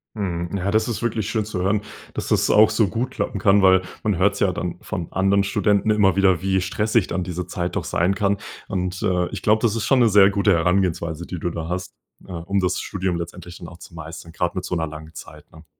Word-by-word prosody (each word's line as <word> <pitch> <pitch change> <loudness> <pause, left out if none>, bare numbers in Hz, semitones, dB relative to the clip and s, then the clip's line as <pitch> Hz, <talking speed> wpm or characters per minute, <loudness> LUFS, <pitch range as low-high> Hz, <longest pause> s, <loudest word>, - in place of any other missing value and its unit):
Mhm, 85 -5 -3
ja, 100 +1 -1
das 110 +1 +2
ist 115 - -3
wirklich 110 -3 -1
schön 110 -2 0
zu 100 -4 -4
hören, 100 +2 +1 0.3
dass - - -4
das - - +2
auch 110 0 +6
so 110 -4 +2
gut 115 +7 -3
klappen - - -3
kann, 100 +1 +4
weil 95 -1 +5 0.2
man 105 -5 0
hört's 100 +2 +2
ja 95 -3 +2
dann 90 -1 -4
von 90 -6 -5
anderen 100 +1 +2
Studenten 100 +1 +1
immer 105 -4 +3
wieder, 95 -3 +3
wie 95 -1 +1
stressig 105 +2 0
dann 90 +1 -2
diese 90 0 -5
Zeit 90 0 -3
doch - - -1
sein 90 +4 0
kann. 100 -1 +1 0.3
Und, 90 -1 -3
äh, 90 -3 +1
ich 100 -3 -6
glaube, 110 +1 +3
das 115 -2 +1
ist 110 -2 -2
schon 135 - +3
'ne 120 - +5
sehr 100 -1 +6
gute 100 0 +2
Herangehensweise, 85 -1 0
die 90 - -5
du 85 - -2
da 80 -1 -5
hast, 90 +1 -4 0.3
äh, 95 - -12
um 90 +3 -2
das 90 - 0
Studium 95 -3 -2
letztendlich 85 +1 -8
dann 85 - -9
auch 85 - -12
zu 85 - -14
meistern, 80 +1 -9
gerade 90 +1 -2
mit 90 - -3
so 90 - -5
'ner 80 -2 -1
langen 80 +1 -10
Zeit, - - -12
ne? 80 0 -16
95 Hz, 245 wpm, -22 LUFS, 85-100 Hz, 0.3 s, auch